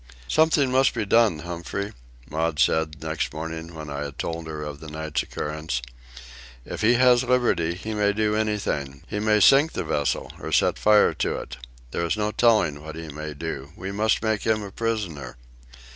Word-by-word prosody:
"Something 150 - +3
must 130 +1 +3
be 110 -3 -1
done, 105 -7 +3
Humphrey," 90 +4 -4 0.3
Maud 80 +2 -1
said, 80 0 +1
next 80 0 -2
morning, 80 +1 -6
when 75 -2 -7
I 70 - -4
had 70 -1 -8
told 85 -1 -4
her 75 -1 -5
of 75 -1 -6
the 80 - -9
night's 80 0 -2
occurrence. 75 -3 -3 0.9
"If - - -6
he 115 +3 +5
has 125 0 +5
liberty, 120 -10 +1
he 110 +4 -5
may 105 -1 +2
do 105 0 0
anything. 100 -11 -2
He 105 - -3
may 105 0 +3
sink 140 - +6
the - - -2
vessel, 75 -1 -1
or - - -6
set - - +2
fire 105 -1 +5
to - - -1
it. - - -7 0.3
There - - -2
is 85 +5 0
no 105 0 0
telling 105 -12 +3
what 80 0 -8
he 80 -1 -7
may 75 0 -6
do. 70 -2 -6
We 95 +2 -5
must 110 +2 +1
make 110 -2 +1
him 110 -1 +1
a 100 - -7
prisoner." 100 - -3
85 Hz, 190 wpm, -25 LUFS, 80-110 Hz, 0.9 s, sink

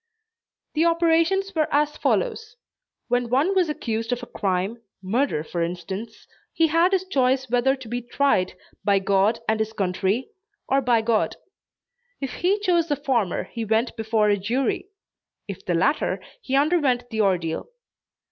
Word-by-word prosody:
The 315 - +2
operations 335 +4 +2
were 315 -3 0
as 295 +1 +2
follows: 455 -2 -1 0.5
When 245 -1 0
one 280 +10 +2
was 365 -4 +2
accused 230 -7 -3
of 245 0 -2
a - - -4
crime, 200 +1 -2 0.2
murder 200 - 0
for 170 +2 -4
instance, 180 +6 -5 0.3
he 325 -1 +2
had 335 +4 +3
his 375 -1 +1
choice 265 -6 +1
whether 250 +2 +3
to 260 -3 -11
be 240 +2 -3
tried 240 -7 +1 0.3
"by 200 0 +3
God 195 +3 +2
and 220 0 +1
his 220 0 -1
country," 195 - -1 0.4
or 275 +1 +2
"by 240 -3 +2
God." 220 -1 +1 0.8
If 270 -2 -4
he 375 +4 +1
chose 345 -4 +2
the 295 - +1
former 255 - 0
he 230 - -6
went 225 +3 0
before 220 -2 +1
a 205 - +3
jury. 240 - -1 0.6
If 200 -3 -7
the 175 - +1
latter, 285 - +1 0.2
he 270 - -2
underwent 280 -5 +2
the 220 -1 0
ordeal. 175 -5 0
245 Hz, 155 wpm, -24 LUFS, 210-300 Hz, 0.8 s, had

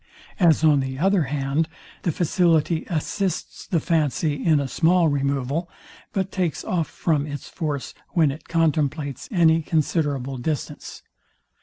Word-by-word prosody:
As 165 -4 +4
on 150 -3 +5
the 130 0 -3
other 190 +1 +2
hand, 140 +3 -1 0.3
the 170 - 0
facility 165 -1 +2
assists 180 +3 -2
the 170 - +1
fancy 155 -2 0
in 155 -3 +4
a 140 - -1
small 170 +4 +3
removal, 140 +3 -1 0.4
but 195 -1 -2
takes 175 -6 -1
off 170 -4 0
from 150 -3 0
its 145 -3 -6
force 150 -5 -4 0.2
when 160 -6 +4
it 150 +3 -10
contemplates 150 -4 0
any 165 -4 +4
considerable 145 -4 -1
distance. 145 +1 -4
155 Hz, 135 wpm, -23 LUFS, 140-170 Hz, 0.4 s, on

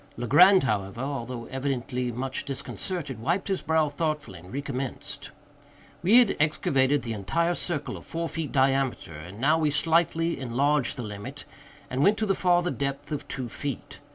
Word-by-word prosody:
Legrand, 180 - +6
however, 105 -4 -1
although 125 -3 -4
evidently 125 -2 -2
much 130 +3 -3
disconcerted, 140 - -4
wiped 175 - -1
his 190 - 0
brow 160 -1 +2
thoughtfully 150 - -3
and 90 +2 -13
recommenced. 135 -1 -4 0.7
We 200 +7 +6
had 245 -5 +5
excavated 145 -2 +2
the 115 -2 -3
entire 165 - 0
circle 170 -4 -3
of - - -11
four 165 0 -3
feet 160 -2 -4
diameter, 135 - +1
and 90 +7 -9
now 150 +6 +3
we 155 -2 +2
slightly 165 +2 +2
enlarged 135 +2 +1
the 125 - -3
limit, 105 -1 -7 0.4
and 130 +2 -2
went 205 +7 +5
to 220 - 0
the 195 - +2
farther 175 -1 +2
depth 140 +1 -3
of 145 -1 -4
two 130 -3 -4
feet. 140 +3 -5
140 Hz, 160 wpm, -27 LUFS, 125-165 Hz, 0.7 s, Legrand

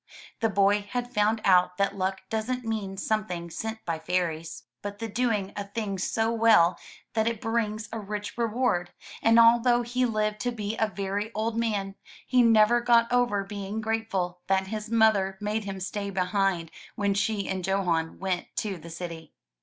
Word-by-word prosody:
The 225 -3 +2
boy 200 0 +3
had 245 +1 -3
found 215 +1 +2
out 180 -1 +4
that 200 0 +1
luck 190 0 -2
doesn't 235 +3 -2
mean 210 -4 -3
something 185 -6 -2
sent 220 +4 -5
by 165 -2 -2
fairies, 165 -1 -2 0.2
but 205 0 -6
the 225 +1 -4
doing 220 -3 -1
a 205 - -4
thing 200 -2 -4
so 225 +4 0
well 220 -7 +4 0.3
that 220 0 +1
it 230 -2 -1
brings 220 -1 -1
a 225 - -3
rich 210 0 -5
reward, 230 -6 0 0.3
and 225 0 +5
although 240 +1 +5
he 250 +1 0
lived 215 -1 -1
to 245 +3 -1
be 215 -2 -4
a 220 - +1
very 200 +2 -3
old 220 +1 -1
man, 210 -4 -1 0.3
he 255 -1 +4
never 230 0 +5
got 235 0 +4
over 245 -5 +2
being 200 +1 -5
grateful 215 -5 -2
that 190 0 +2
his 215 +2 -5
mother 215 -4 +3
made 210 +1 -2
him 195 -1 -5
stay 200 +2 -4
behind 185 -3 0 0.2
when 200 -1 +1
she 200 0 0
and 185 -1 -3
Johan 175 -4 0
went 185 -2 -2
to 200 -5 -2
the 165 +2 -11
city. 165 -2 -8
210 Hz, 175 wpm, -27 LUFS, 190-225 Hz, 0.3 s, and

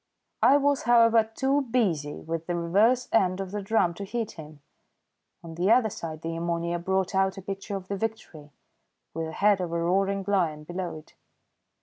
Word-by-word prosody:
I 280 - +6
was, 285 -1 +1
however, 230 -1 +6
too 275 +2 +1
busy 195 - -1
with 165 0 -4
the 175 - -1
reverse 205 +9 +2
end 185 -4 +2
of 190 -1 -5
the 205 0 -3
drum 195 -4 +1
to 200 - -7
heed 225 +2 -3
him. 150 -2 -12 0.8
On 165 -1 -9
the 175 +4 0
other 230 -2 +4
side 160 -3 -7
the 165 0 -3
ammonia 170 +1 -2
brought 190 +2 -1
out 190 0 +1
a - - -6
picture 195 +2 -5
of 190 -1 -6
the 200 - -3
Victory, 190 -8 -5 0.6
with 165 0 -3
the - - -6
head 200 0 +3
of 175 -2 -3
a 170 - -1
roaring 195 +3 0
lion 170 -7 0
below 175 0 -5
it. 155 - -15
190 Hz, 190 wpm, -26 LUFS, 170-215 Hz, 0.8 s, I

